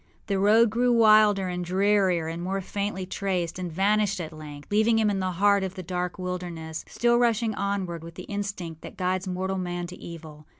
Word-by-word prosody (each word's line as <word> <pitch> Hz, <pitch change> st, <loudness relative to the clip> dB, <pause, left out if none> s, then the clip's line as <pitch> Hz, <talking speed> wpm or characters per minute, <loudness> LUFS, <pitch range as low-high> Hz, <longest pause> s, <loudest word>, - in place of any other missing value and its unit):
The 200 Hz, -2 st, -1 dB
road 215 Hz, +3 st, +5 dB
grew 245 Hz, +2 st, +2 dB
wilder 215 Hz, -4 st, +5 dB
and 180 Hz, 0 st, -3 dB
drearier 190 Hz, -2 st, +2 dB
and 165 Hz, +1 st, -4 dB
more 190 Hz, +2 st, -2 dB
faintly 200 Hz, 0 st, -3 dB
traced, 185 Hz, -3 st, -2 dB
and 180 Hz, -2 st, -4 dB
vanished 200 Hz, +3 st, +1 dB
at 160 Hz, -2 st, -5 dB
length, 150 Hz, 0 st, -10 dB
leaving 220 Hz, +2 st, +3 dB
him 215 Hz, -2 st, +3 dB
in 195 Hz, -, -1 dB
the 185 Hz, -1 st, -1 dB
heart 200 Hz, +2 st, +3 dB
of 190 Hz, 0 st, -4 dB
the 185 Hz, -, -6 dB
dark 180 Hz, +1 st, -3 dB
wilderness, 175 Hz, -3 st, -5 dB
still 240 Hz, 0 st, +2 dB
rushing 230 Hz, -2 st, +2 dB
onward 195 Hz, -5 st, -3 dB
with 165 Hz, 0 st, -10 dB
the -, -, -8 dB
instinct 200 Hz, -6 st, -5 dB
that -, -, -10 dB
guides 185 Hz, +1 st, -1 dB
mortal 190 Hz, +1 st, -2 dB
man 175 Hz, -1 st, -3 dB
to 180 Hz, +1 st, -9 dB
evil. 155 Hz, -3 st, -10 dB
185 Hz, 200 wpm, -26 LUFS, 175-205 Hz, -, road